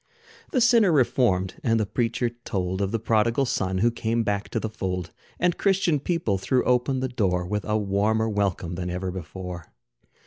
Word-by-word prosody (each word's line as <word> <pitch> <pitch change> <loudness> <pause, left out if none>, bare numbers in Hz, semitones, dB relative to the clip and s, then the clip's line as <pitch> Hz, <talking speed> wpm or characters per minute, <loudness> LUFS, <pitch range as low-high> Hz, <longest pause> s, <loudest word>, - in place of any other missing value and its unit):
The 255 - +2
sinner 230 -5 +5
reformed; 115 - +2
and 115 -1 +2
the 110 - +1
preacher 120 +3 -1
told 95 -6 -3
Of 100 -1 0
the 115 - +1
prodigal 115 +4 +2
son 95 -6 -1
who 120 - +4
came 115 0 -1
back 100 -1 -2
to 115 - -1
the 110 - -2
fold. 90 -5 -4 0.3
And 175 -1 +1
Christian 190 -6 +2
people 140 - -1
threw 125 +6 +1
open 125 +1 +1
the 130 - 0
door, 95 -8 0
With 105 +3 -3
a 105 0 +1
warmer 105 +2 +1
welcome 100 -5 -1
than 90 0 -4
ever 90 +1 -3
before. 90 -1 -7
110 Hz, 180 wpm, -25 LUFS, 95-125 Hz, 0.3 s, sinner